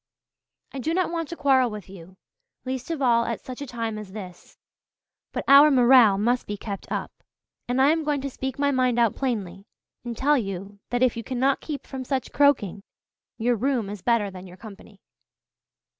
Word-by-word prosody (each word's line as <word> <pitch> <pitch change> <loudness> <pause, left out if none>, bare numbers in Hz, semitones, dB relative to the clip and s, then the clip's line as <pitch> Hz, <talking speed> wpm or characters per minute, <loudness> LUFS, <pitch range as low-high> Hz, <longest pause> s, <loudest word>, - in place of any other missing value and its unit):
I 275 - -5
do 320 +6 -1
not 370 -2 0
want 330 -3 -3
to 340 - -5
quarrel 265 -5 +3
with 210 -4 -8
you, 185 -1 -13 0.5
least 255 +1 -4
of 320 -4 -2
all 235 -2 +4
at 230 - -3
such 255 +1 -9
a 285 - -5
time 230 -3 -4
as 200 -3 -10
this, 185 -4 -10 0.7
but - - -3
our 280 +2 +8
morale 250 -6 +6
must 240 +5 0
be 205 - -4
kept 200 -1 -7
up, - - -3 0.6
and 245 +2 0
I 275 +3 +5
am 320 0 0
going 295 -1 0
to 275 - -3
speak 265 0 -5
my 285 0 +1
mind 255 -2 +1
out 230 -3 +3
plainly 200 -7 -3 0.4
and 240 -2 -6
tell 290 +1 +3
you 195 -1 -6
that 245 +1 +1
if 255 - +2
you 230 - -5
cannot 265 +2 0
keep 295 -3 -6
from 265 -1 -6
such 260 -1 -3
croaking 245 -10 +2 0.6
your 240 +1 +1
room 235 -3 -1
is 205 -3 -7
better 225 -3 +1
than 185 0 -10
your 180 0 -13
company." 205 -1 -13
245 Hz, 195 wpm, -25 LUFS, 205-270 Hz, 0.7 s, our